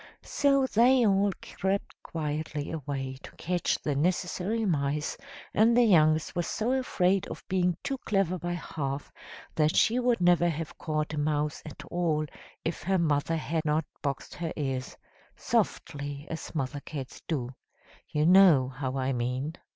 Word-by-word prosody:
So 275 -2 +2
they 250 +1 +4
all 200 0 +3
crept 195 +1 -2
quietly 150 -2 -3
away 135 -4 -4
to - - -11
catch 175 0 0
the 145 - 0
necessary 180 +7 0
mice, 150 -4 0 0.4
and 230 +3 +4
the 245 - +7
youngest 155 -7 +4
was 175 -1 -1
so 225 +3 -1
afraid 195 -8 +1
of - - -8
being 180 -2 +1
too 270 -2 -2
clever 195 -5 0
by 175 +1 -3
half, 145 -5 -4 0.4
that 155 0 +2
she 235 +3 +4
would 245 -1 +2
never 175 -1 +4
have 160 -1 -4
caught 155 -1 -2
a 150 - -2
mouse 150 0 0
at 150 - -9
all, 165 -3 +1 0.4
if 165 - -2
her 190 +1 +1
mother 155 -1 +1
had 160 +1 -2
not 155 0 +1 0.2
boxed 140 -1 -3
her 165 -2 -4
ears 135 -3 -3 0.4
softly, 145 0 -2
as 165 +1 -6
mother 145 -1 -2
cats 140 -2 -7
do; 130 -6 -2 0.6
you 150 0 +1
know 175 -8 +7
how 130 0 -4
I 135 0 0
mean! 125 +5 -2
160 Hz, 155 wpm, -28 LUFS, 145-185 Hz, 0.6 s, the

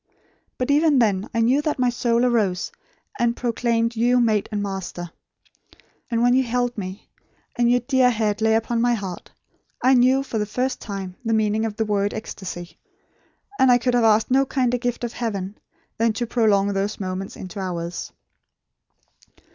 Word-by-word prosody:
But 255 +2 0
even 300 0 +4
then 205 -4 +1
I 230 - 0
knew 255 +5 +3
that 300 0 -1
my 250 -1 +2
soul 235 0 +1
arose 210 -7 0 0.5
and 235 0 +1
proclaimed 235 -1 0
you 245 +2 +3
mate 220 -4 +1
and 210 - -2
master. 190 -3 -5 1.0
And 230 -1 +1
when 245 0 +4
you 260 - +4
held 245 0 -1
me, 190 -1 -7 0.5
and 240 -1 +2
your 245 0 +3
dear 260 0 +3
head 215 -2 -1
lay 220 0 +3
upon 230 +1 0
my 240 0 +3
heart, 190 -5 -6 0.5
I 260 +1 +4
knew, 260 +2 +4
for 230 -5 -3
the 210 - -1
first 255 +4 -2
time 195 -3 -6
the 225 -1 0
meaning 215 0 +1
of 210 - -6
the 220 0 -1
word 205 -1 0
ecstasy; 180 -5 -7 0.8
and 260 -1 +6
I 245 - +6
could 245 +1 0
have 240 -1 +3
asked 220 +1 +3
no 270 +1 +5
kinder 250 -2 0
gift 245 0 -3
of 240 -1 -3
heaven, 205 -4 -4 0.4
than 230 -1 +2
to 240 +2 -2
prolong 205 -4 +2
those 200 +2 -2
moments 190 0 -4
into 190 +2 -8
hours." 175 -2 -4
230 Hz, 175 wpm, -23 LUFS, 205-245 Hz, 1.0 s, and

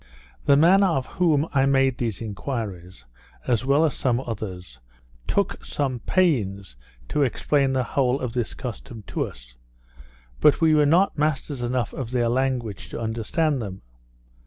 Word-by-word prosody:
The 140 - +5
man 180 +6 +6
of 165 -9 +2
whom 160 -4 +1
I 135 -1 +3
made 135 -2 +2
these 115 -3 -2
enquiries, 100 - -5 0.4
as 125 0 +1
well 140 +4 +4
as 150 - 0
some 125 -2 0
others, 95 - -6 0.5
took - - -1
some 135 -4 -2
pains 105 - 0 0.3
to 150 - 0
explain 135 +1 +1
the 130 -1 +1
whole 130 +1 0
of 125 -3 -4
this 120 -3 -2
custom 120 -2 -7
to - - -2
us; - - -13 0.8
but 150 - +5
we 160 -2 +4
were 150 -1 +4
not 170 +1 +3
masters 145 -3 -1
enough 120 -1 -1
of 130 -4 -5
their 120 -2 +1
language 125 -5 -1
to - - -6
understand 120 +6 -1
them. 95 - -7
130 Hz, 155 wpm, -24 LUFS, 110-145 Hz, 0.8 s, man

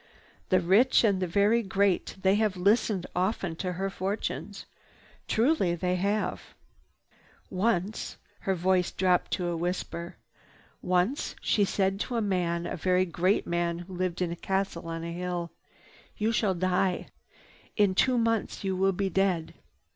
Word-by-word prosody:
The 185 - +4
rich 205 +11 +4
and 200 -4 +2
the 185 - 0
very 205 +6 +3
great, 195 -2 0
they 190 0 +3
have 210 -2 +1
listened 200 0 +2
often 185 -2 -1
to 180 0 -2
her 195 +2 -2
fortunes. 195 +3 -4 0.6
Truly 225 - +2
they 180 +1 0
have. 200 +3 -2 1.0
"Once—" 195 +1 -1 0.2
her 190 - -1
voice 180 0 +2
dropped 180 -1 +1
to 180 -2 -1
a 170 - -1
whisper. 170 0 -4 0.6
"Once 185 +10 0
she 205 - +2
said 195 0 0
to 245 - -3
a - - +2
man, 175 -4 0
a - - -3
very 185 +2 +2
great 180 +3 +1
man 170 0 -1
who 175 +2 -9
lived 180 0 -1
in 170 - -2
a - - -3
castle 190 -2 -2
on 165 0 -4
a 170 - -4
hill: 175 -1 -3 0.7
'You 215 +2 +1
shall 210 -4 +1
die. 185 +1 0 0.7
In 205 -3 +4
two 250 +6 +3
months 230 -2 0
you 190 -1 -1
will 195 +1 +2
be 195 +1 -1
dead. 185 -3 0
185 Hz, 155 wpm, -28 LUFS, 175-200 Hz, 1.0 s, The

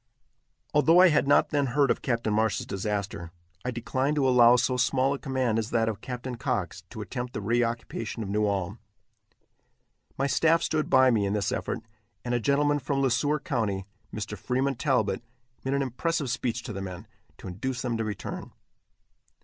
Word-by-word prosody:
Although 160 +3 +5
I 185 0 +8
had 150 -3 +2
not 145 - +4
then 145 -2 +1
heard 140 -2 +5
of - - -1
Captain 115 -4 0
Marsh's 110 0 +1
disaster, 100 -4 -3 0.3
I 125 - -2
declined 130 +4 -1
to 140 -3 +2
allow 125 -1 +7
so 125 +1 +1
small 130 +2 +2
a 140 - -4
command 130 -5 0
as 110 0 -3
that 115 -1 +1
of 105 -2 -3
Captain 125 -1 -5
Cox - - -2
to - - -7
attempt 125 0 -5
the - - -3
reoccupation 115 0 -1
of 100 - -6
New 105 +1 +1
Ulm. 100 +1 -2 1.4
My 135 - +1
staff 165 +5 +3
stood 155 -1 0
by 130 0 +6
me 105 -4 +2
in 100 - -1
this 105 -3 0
effort, - - -3 0.4
and 120 - -1
a 120 - +2
gentleman 145 +3 +2
from 140 +1 -1
Le 135 -2 +2
Sueur 150 +5 +1
county, 105 - -1 0.3
Mr. 105 0 -5
Freeman 130 +7 0
Talbott, 135 +1 0 0.4
made 135 +1 0
an 140 - +1
impressive 140 +2 -1
speech 120 -1 -2
to 115 - -6
the 95 - -5
men, 95 +2 -7 0.3
to - - -10
induce 125 +8 -4
them 120 -2 -1
to 115 - -1
return. 105 -1 -6
125 Hz, 185 wpm, -27 LUFS, 110-135 Hz, 1.4 s, I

